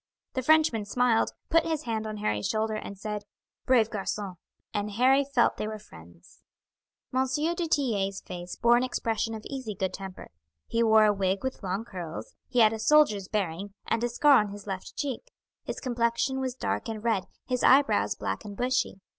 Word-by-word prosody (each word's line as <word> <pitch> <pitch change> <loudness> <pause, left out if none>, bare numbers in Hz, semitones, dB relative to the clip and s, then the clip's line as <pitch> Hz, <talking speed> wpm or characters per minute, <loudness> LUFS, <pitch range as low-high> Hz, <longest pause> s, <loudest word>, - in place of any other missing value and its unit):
The 260 - -1
Frenchman 305 -6 +3
smiled, 235 +1 +2 0.2
put 330 0 +5
his 320 -2 -2
hand 220 -2 -2
on 215 0 -5
Harry's 105 - -1
shoulder, 220 0 0
and 205 -2 -6
said: 210 +1 -4 0.5
"Brave 230 -4 +4
garcon!" 200 -1 -3 0.4
and 205 -1 -1
Harry 260 +5 +4
felt 270 -3 +2
they 215 - -2
were 215 0 -4
friends. 85 - -16 0.7
M. 260 +1 +2
du 335 +3 0
Tillet's 210 -11 0
face 175 -1 -7
bore 235 0 +4
an 245 - +1
expression 225 -3 -1
of 215 - -9
easy 260 -7 -5
good 190 0 -2
temper. 190 -1 -8 0.3
He 230 - 0
wore 220 -1 +6
a 210 - +4
wig 195 +1 0
with 260 0 -3
long 195 +3 -3
curls; 175 -7 -7
he 250 - +2
had 215 0 +6
a 220 - -4
soldier's 220 -6 +4
bearing, 195 -1 -3
and 230 +1 0
a 240 - +1
scar 280 +3 +5
on 210 -1 -1
his 205 0 -9
left 190 -2 -6
cheek; 290 - -3 0.4
his - - -4
complexion 240 +2 0
was 260 -2 -2
dark 260 - -2
and 220 -1 -5
red, 220 -6 +1 0.2
his 250 -1 -1
eyebrows 255 - +4
black 95 -1 -3
and 205 -1 -8
bushy. 250 -5 0
220 Hz, 190 wpm, -28 LUFS, 200-255 Hz, 0.7 s, wore